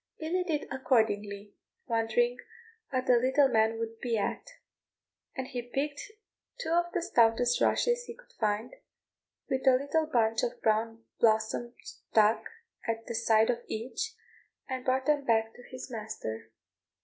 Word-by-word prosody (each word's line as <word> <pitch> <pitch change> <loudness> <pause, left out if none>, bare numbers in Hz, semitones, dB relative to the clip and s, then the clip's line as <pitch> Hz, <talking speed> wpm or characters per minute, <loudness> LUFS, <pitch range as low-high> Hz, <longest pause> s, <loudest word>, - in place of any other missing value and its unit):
Billy 345 +3 -1
did 315 -5 -2
accordingly, 210 -6 0 0.3
wondering 235 +1 +1 0.5
what 255 -2 -1
the 250 -2 +5
little 265 +4 +4
man 225 -2 +2
would 225 0 -5
be 235 -2 -1
at; 355 - -3 0.8
and 260 -1 -4
he 250 -3 -3
picked 280 +4 -3 0.6
two 410 - -3
of 345 +1 +2
the 355 -3 -1
stoutest 240 -5 +3
rushes 485 0 +2
he - - -8
could - - -20
find, 215 +3 0 0.7
with 265 -1 -1
a 260 - +8
little 285 +4 0
bunch 225 -6 +2
of - - -2
brown 225 +1 +1 0.2
blossom 220 +2 +1
stuck 215 0 +1 0.4
at 225 0 -2
the - - -5
side 225 0 +3
of 235 - -3
each, 325 - -4 0.5
and 260 -1 -4
brought 260 0 +1
them 295 -1 +2
back 225 -3 +1
to - - -14
his 255 0 -8
master. 210 - -6
240 Hz, 150 wpm, -30 LUFS, 225-275 Hz, 0.8 s, a